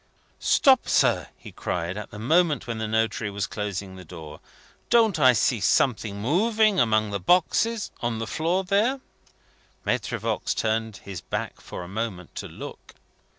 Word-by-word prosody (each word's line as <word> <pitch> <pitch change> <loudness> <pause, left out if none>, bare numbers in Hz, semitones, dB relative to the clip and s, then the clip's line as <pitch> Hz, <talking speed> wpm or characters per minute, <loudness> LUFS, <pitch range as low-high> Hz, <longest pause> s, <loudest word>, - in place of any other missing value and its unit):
"Stop, 265 -2 +4
sir!" - - +3
he - - -12
cried, 90 +1 -3
at 105 - -6
the 110 - -10
moment 155 +5 +2
when 115 -2 -4
the 110 - -2
notary 110 0 0
was 100 0 -2
closing 100 -2 -5
the 90 - -10
door. 80 -3 -10 0.5
"Don't 220 -8 +4
I 130 -3 +7
see 115 +1 +2
something 110 -3 +1
moving 210 - +2
among 110 -2 +2
the 100 - -2
boxes 200 - +2
on 120 -1 -1
the 115 - -3
floor 170 - 0
there?" 210 +8 +1 0.9
(Maitre - - -1
Voigt - - -2
turned 110 -1 -1
his 95 -3 -7
back - - -5
for - - -7
a - - -9
moment 100 -3 -5
to - - -4
look. - - -10
115 Hz, 160 wpm, -25 LUFS, -, 0.9 s, I